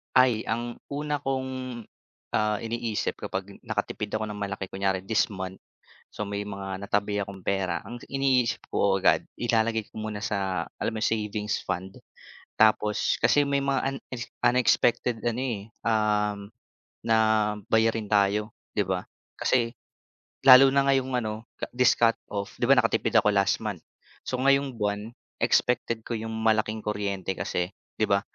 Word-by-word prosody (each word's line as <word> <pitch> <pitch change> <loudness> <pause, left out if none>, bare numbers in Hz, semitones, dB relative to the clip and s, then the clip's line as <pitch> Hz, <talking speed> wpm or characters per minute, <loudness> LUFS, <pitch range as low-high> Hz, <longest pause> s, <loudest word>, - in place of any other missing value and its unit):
Ay, 125 -4 +4
ang 120 +2 -3
una 145 0 -2
kong, 130 -3 -3 0.5
ah, 105 -1 +1
iniisip 115 -1 -2
kapag 95 +1 -5
nakatipid 105 0 -3
ako 110 0 -2
ng 105 - -6
malaki, 100 -1 -4
kunyari 95 -1 -1
this 110 +2 +2
month, 95 -2 -6 0.5
so, 105 - -4
may 100 0 -3
mga 95 -1 -5
natabi 105 0 0
akong 100 -2 -6
pera, 95 -3 -1
ang 120 0 -8
iniisip 135 -3 +1
ko 95 -1 +2
agad - - +4
ilalagay 115 -1 +1
ko 110 - -8
muna 105 -1 -4
sa, 95 -5 -1 0.2
alam - - -1
mo - - -2
yung - - +3
savings 105 -1 -1
fund, 95 +2 -4 0.6
tapos 105 -1 +3
kasi 145 - +4
may 140 0 +1
mga 135 0 0
unex 125 -2 -7 0.2
unexpected 120 -1 +3
ano, 120 +2 0
eh, 120 -7 -2 0.2
um, 105 -2 +1 0.7
na 115 -1 +4 0.5
bayarin 110 -1 +3
tayo, 105 +1 +2 0.2
'di 105 - +4
ba? 95 -1 0 0.4
Kasi 120 -2 +1 0.7
lalo 130 +1 +10
na 140 0 +3
ngayong 135 -1 +2
ano, 110 0 -3 0.3
this 125 -1 +5
cut 115 -1 +5 0.2
off, 100 -1 -4
'di - - +3
ba - - +7
nakatipid - - +1
ako 105 - +5
last 100 -1 +3
month, 100 -7 -4 0.4
so 130 - -2
ngayong 140 -1 +3
buwan 105 +1 -2 0.3
expected 115 -2 +2
ko 120 - -4
yung 110 +1 -5
malaking 110 -1 +1
kuryente 100 -3 -2
kasi, 90 +2 -2 0.3
'di 110 - +4
ba, 100 0 +3
110 Hz, 150 wpm, -27 LUFS, 100-120 Hz, 0.7 s, lalo